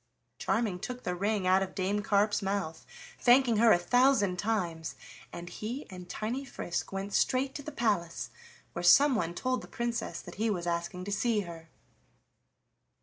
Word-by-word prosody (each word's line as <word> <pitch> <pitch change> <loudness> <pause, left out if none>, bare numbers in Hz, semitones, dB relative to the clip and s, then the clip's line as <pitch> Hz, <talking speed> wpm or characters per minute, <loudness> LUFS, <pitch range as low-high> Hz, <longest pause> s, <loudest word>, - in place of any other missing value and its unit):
Charming 220 -6 0
took 250 +5 -6
the 180 - -1
ring 200 +2 0
out 185 +1 +4
of 190 -1 -4
Dame 200 +2 0
Carp's 205 +1 +2
mouth, 195 -5 -3 0.3
thanking 245 -2 +5
her 225 +1 +6
a - - +7
thousand 205 -2 +3
times, 175 -7 -2 0.4
and 170 0 -7
he 235 +10 -5
and 180 -1 -9
tiny 235 +8 -3
Frisk 175 -9 -4
went 195 +1 -4
straight 265 +1 +2
to - - -6
the 305 - -7
palace, 175 - -1 0.4
where 170 - -4
someone 180 - +5
told 255 +4 -1
the - - -11
Princess 235 -1 -3
that 175 - -10
he 225 - +2
was 180 -5 -2
asking 170 +1 -2
to 205 - -4
see 215 +1 +1
her. 165 -3 -9
200 Hz, 165 wpm, -30 LUFS, 175-235 Hz, 0.4 s, a